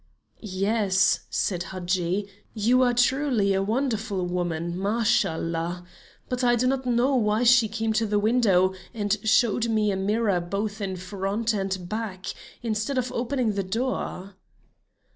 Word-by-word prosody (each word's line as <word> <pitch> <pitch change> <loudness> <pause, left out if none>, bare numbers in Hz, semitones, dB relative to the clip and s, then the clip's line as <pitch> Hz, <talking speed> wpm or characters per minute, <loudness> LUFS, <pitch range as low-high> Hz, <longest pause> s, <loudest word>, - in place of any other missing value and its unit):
"Yes," 195 -1 +1
said 180 -3 -1
Hadji. 185 +1 -1 0.3
"You 235 +4 +3
are 250 -1 +4
truly 245 -5 +2
a 190 - +1
wonderful 220 -3 -1
woman, 175 -1 -2
Mashallah! 175 -4 0 0.4
But 250 0 -2
I 240 -1 +4
do 240 +2 0
not 260 0 0
know 245 +3 +2
why 215 -1 +2
she 240 -2 +6
came 220 +1 -2
to 220 +1 +1
the 210 0 +1
window 205 -4 +3 0.2
and 205 -2 +1
showed 225 +1 +2
me 215 -2 +2
a - - -1
mirror 200 0 +1
both 205 +4 -3
in 190 -2 -2
front 195 +5 -2
and 190 -3 -3
back, 210 -3 -5 0.4
instead 225 +4 -1
of 255 -1 -1
opening 245 -2 -1
the 200 - -1
door." 200 -2 -3
210 Hz, 140 wpm, -25 LUFS, 190-235 Hz, 0.4 s, she